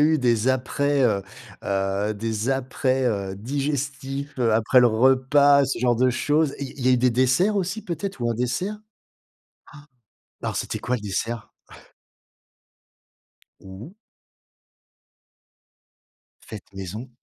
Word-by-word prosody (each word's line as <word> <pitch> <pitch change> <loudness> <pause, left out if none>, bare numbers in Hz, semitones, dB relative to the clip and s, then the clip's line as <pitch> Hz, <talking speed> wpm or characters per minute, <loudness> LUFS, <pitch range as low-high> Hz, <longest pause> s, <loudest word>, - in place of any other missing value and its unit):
eu 155 +1 +4
des 120 -2 +2
après, 140 +2 +1
heu 105 -5 +1 0.4
heu, 100 +2 -1
des 110 +2 -3
après, 130 0 0
heu, 100 -4 -2
digestifs, 140 +3 -3
heu, 115 -2 +3
après 115 +4 +4
le 120 - +6
repas, 135 +4 +4
ce 135 - -2
genre 120 0 +2
de 130 +2 +2
choses, 145 +4 +1
il 140 -2 -5
il 130 -3 -3
y - - +5
a - - +5
eu - - +5
des 125 +1 +3
desserts 130 - +2
aussi 200 +2 -2
peut-être, 180 -3 -5
ou 120 - 0
un - - -1
dessert? 125 - -2
Han. 210 - -15 1.6
Alors, - - -2
c'était - - -3
quoi 125 - -1
le 120 - -6
dessert? 105 +3 -4 2.1
Mmh 95 +2 -10
mh. 175 +9 -13 2.5
Faite 110 -2 -11
maison? 95 +6 -7
125 Hz, 135 wpm, -24 LUFS, 110-140 Hz, 2.5 s, le